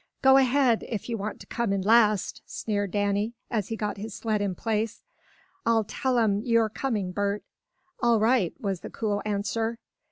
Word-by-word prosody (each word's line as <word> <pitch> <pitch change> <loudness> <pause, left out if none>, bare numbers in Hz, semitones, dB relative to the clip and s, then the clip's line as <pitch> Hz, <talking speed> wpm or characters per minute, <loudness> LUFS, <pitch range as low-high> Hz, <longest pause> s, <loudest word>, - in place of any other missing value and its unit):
"Go 265 0 +7
ahead, 260 -3 +3
if 225 0 -4
you 235 - -1
want 210 0 -4
to - - -10
come 235 -4 -1
in 195 -1 0
last!" 215 -2 +3
sneered 205 -2 -2
Danny, 205 +3 0 0.2
as 215 -5 0
he 225 - -3
got 210 -1 -3
his 210 +1 -6
sled 215 -2 -1
in 195 -3 -1
place. 220 +2 -2 0.6
"I'll 230 -4 +3
tell 250 +4 -1
'em 210 -3 +2
you're 230 -1 +2
coming, 215 -6 -2
Bert." 200 +2 -1 0.6
"All 235 -2 +4
right," 220 -4 +3
was 195 -4 -2
the - - -8
cool 205 -2 -2
answer. 215 +3 -1
215 Hz, 180 wpm, -27 LUFS, 205-230 Hz, 0.6 s, Go